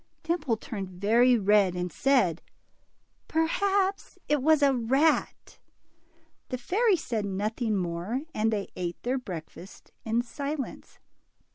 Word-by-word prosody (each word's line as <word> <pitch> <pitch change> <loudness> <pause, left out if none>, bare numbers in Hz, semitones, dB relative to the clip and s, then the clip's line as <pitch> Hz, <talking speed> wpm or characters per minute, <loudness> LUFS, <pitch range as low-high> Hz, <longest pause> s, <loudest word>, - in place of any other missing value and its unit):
Dimple 310 -9 0
turned 200 -4 -6
very 230 +7 +3
red, 200 -3 +3
and 180 0 -3
said, 215 - +2 0.9
Perhaps 385 +4 0
it 295 -2 +2
was 310 +1 +4
a 275 -1 +5
rat." 265 +6 +1 0.9
The 255 - -2
fairy 400 - +2
said 230 -8 -3
nothing 210 +3 -1
more, 180 +7 -2
and 220 +1 +1
they 205 -2 -2
ate 175 -1 -4
their 255 +2 0
breakfast 180 -3 -9
in 230 +2 0
silence. 280 +2 -6
235 Hz, 120 wpm, -28 LUFS, 195-285 Hz, 0.9 s, a